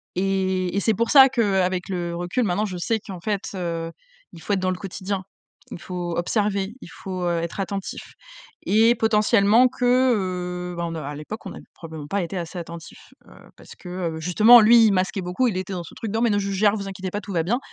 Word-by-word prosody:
et 190 -1 0
et 200 - +2
c'est 220 - +2
pour 230 +3 -1
ça 270 -2 +8
qu'avec 190 -6 0
le 175 -2 -3
recul, 175 +8 -1
maintenant, 205 +2 0
je 185 - -5
sais 220 +5 -1
qu'en 185 -4 -9
fait, 205 -1 -2
heu, 165 -2 -3 0.4
il 165 - -12
faut 205 - -5
être 190 - +1
dans 185 0 0
le 180 - -3
quotidien. 195 0 -5 0.5
Il - - -7
faut 175 -2 -5
observer, 200 +2 -1
il - - -11
faut, 185 -2 -7
heu, 175 -1 0
être 170 +3 -5
attentif 195 +1 -5 0.6
et 225 +3 +4
potentiellement 220 +1 +4
que, 250 0 -3 0.3
heu, 180 -2 -4
ben 170 0 -3
n 165 - -5
heu, 155 - -5
à 145 +1 -6
l'époque, 155 +9 -8
on - - -6
a - - -10 0.2
probablement 160 -3 -9
pas 200 +3 -1
été 170 - -6
assez 170 +1 -6
attentifs, 170 -1 -11
heu, - - -18 0.3
parce - - -14
que, - - -13 0.3
heu, - - -6
justement, 215 +9 +7
lui, 230 +1 +7
il - - +3
masquait 190 +1 0
beaucoup, 180 +8 0
il 215 - -1
était 185 +1 -4
dans 175 -2 -4
ce - - -13
truc 220 -3 -5
de: 220 - -1
«Non - - 0
mais 235 - +3
non 205 - +2
je 200 0 -3
gère, 205 +1 +3
ne - - -2
vous 195 -1 -6
inquiétez 185 -1 -6
pas, 205 - -3
tout 200 - -9
va 165 -2 +1
bien». 235 +9 0
190 Hz, 240 wpm, -23 LUFS, 175-210 Hz, 0.6 s, ça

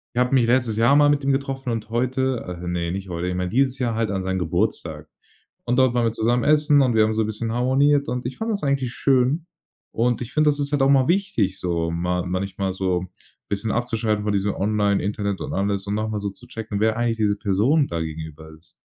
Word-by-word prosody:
Ich - - -1
habe 125 +2 +1
mich 120 -3 +4
letztes 120 -3 +1
Jahr 120 +5 +4
mal 145 0 +5
mit 145 0 +1
ihm 135 0 +1
getroffen 135 -2 -2
und 115 -1 -4
heute 130 +1 0 0.2
äh, - - -6
ne, 85 -1 -2
nicht 95 +1 -5
heute. 85 +1 -3
Ich 90 - -2
meine 90 0 -2
dieses 130 +3 +1
Jahr 120 -3 -1
halt 110 -1 -1
an 95 -1 -2
seinen 95 0 -2
Geburtstag. 85 -3 -2 0.6
Und 125 +2 0
dort 130 -2 +4
waren 120 -1 +2
wir 115 - +1
zusammen 120 +2 +1
essen 150 -1 +4
und 125 -3 +1
wir 110 -1 +5
haben 110 - +1
so 110 - +1
'n 105 - -1
bisschen 110 +1 -3
harmoniert 140 +4 +2
und 125 -1 -3
ich 125 - -6
fand 225 +1 -2
das 205 -5 -2
eigentlich 135 -3 0
schön. 135 +5 +1 0.5
Und 120 +2 0
ich 125 +1 -7
finde, 150 +1 +3
das 145 0 -3
ist 140 +1 -3
halt 145 - +1
auch 135 - +4
mal 135 -1 +4
wichtig, 170 - 0
so 85 -2 -1
ma 90 +1 -1
manchmal 95 +1 -2
so 95 -1 -1 0.4
bisschen 105 +2 -2
abzuschalten 115 -3 -1
von 105 - 0
diesem 100 0 0
Online 100 0 +1
Internet 100 0 -2
und - - -5
alles 100 0 -1
und 100 - -2
noch 110 +1 -1
mal 105 - -2
so 100 -1 -3
zu 95 - -14
checken, 110 -2 -5
wer 110 0 +2
eigentlich 120 -1 0
diese 105 -1 +1
Person 120 +10 +2
da 85 -1 -4
gegenüber 80 -1 -7
ist. 80 0 -23
110 Hz, 240 wpm, -23 LUFS, 95-130 Hz, 0.6 s, mal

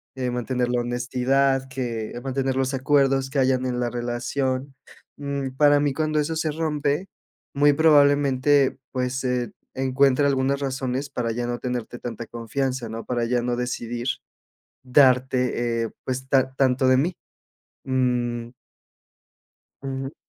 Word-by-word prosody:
eh, 125 -1 -2
mantener 125 0 -1
la 125 0 +1
honestidad, 130 +2 +1
que 120 -3 -4
mantener 135 0 -1
los 135 +1 0
acuerdos 135 0 +2
que 140 - -4
hayan 130 -1 +2
en 125 -1 -2
la 120 - 0
relación. 130 +3 -2 0.4
Mm, 140 -2 -3
para 145 0 +5
mí, 145 -2 +1
cuando 155 0 0
eso 155 +2 -1
se 160 -1 -1
rompe, 150 +2 -1 0.5
muy 145 +1 +5
probablemente, 145 -3 +4
pues, 130 0 -2
eh, 125 -1 -1 0.2
encuentre 135 +1 +2
algunas 135 0 +1
razones 135 0 -2
para 120 -4 -2
ya 120 +1 -3
no 120 0 -2
tenerte 125 -1 -4
tanta 115 -1 -6
confianza, 120 +2 -3
¿no? 115 +1 -6
Para 120 -2 -1
ya 120 +1 +1
no 120 0 -1
decidir, 120 -1 -3 0.8
darte, 125 -3 +3
eh, - - -5
pues, 130 0 -4
ta 130 -1 +2
tanto 130 -1 +2
de 130 - +5
mí. 165 +7 0 0.7
Mm. 120 -2 0 1.3
Ujú. 135 +1 -4
130 Hz, 140 wpm, -24 LUFS, 125-140 Hz, 1.3 s, para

